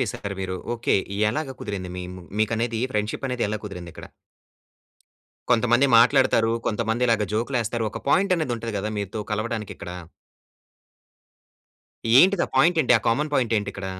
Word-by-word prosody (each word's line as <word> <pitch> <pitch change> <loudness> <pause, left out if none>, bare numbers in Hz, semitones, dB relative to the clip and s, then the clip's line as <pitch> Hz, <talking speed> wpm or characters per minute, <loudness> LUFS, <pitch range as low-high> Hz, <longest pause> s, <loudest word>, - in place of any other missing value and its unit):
చేసారు 100 -4 -3
మీరు? 95 0 -3 0.2
ఓకే. 115 - 0 0.4
ఎలాగ 135 0 -4
కుదిరింది 100 -6 -5
మీ 90 - -5 0.4
మీకనేది 115 +1 0
ఫ్రెండ్‌షిప్ 105 +6 -2
అనేది 125 -1 -1
ఎలా 110 - -2
కుదిరింది 90 -4 -7
ఇక్కడ? - - -10 1.4
కొంతమంది 120 +3 +4
మాట్లాడుతారు, 120 -2 +4
కొంతమంది 115 +2 0
ఇలాగా 110 -3 +2
జోక్‌లు 120 +4 -1
వేస్తారు. 115 0 -2
ఒక - - -8
పాయింట్ 185 +4 +3
అనేది 150 -7 -1
ఉంటది 115 -1 -5
గదా! 105 +2 -3
మీతో 100 +2 -4
కలవడానికి 110 0 -3
ఇక్కడ. 90 - -8 2.3
ఏంటిది 190 0 +4
ఆ - - -18
పాయింట్ 165 +5 +4
ఏంటి? 125 - +3
ఆ - - -13
కామన్ 150 +6 0
పాయింట్ 120 -4 +1
ఏంటి 100 -1 -2
ఇక్కడ? 100 -1 -6
115 Hz, 150 wpm, -24 LUFS, 105-130 Hz, 2.3 s, కొంతమంది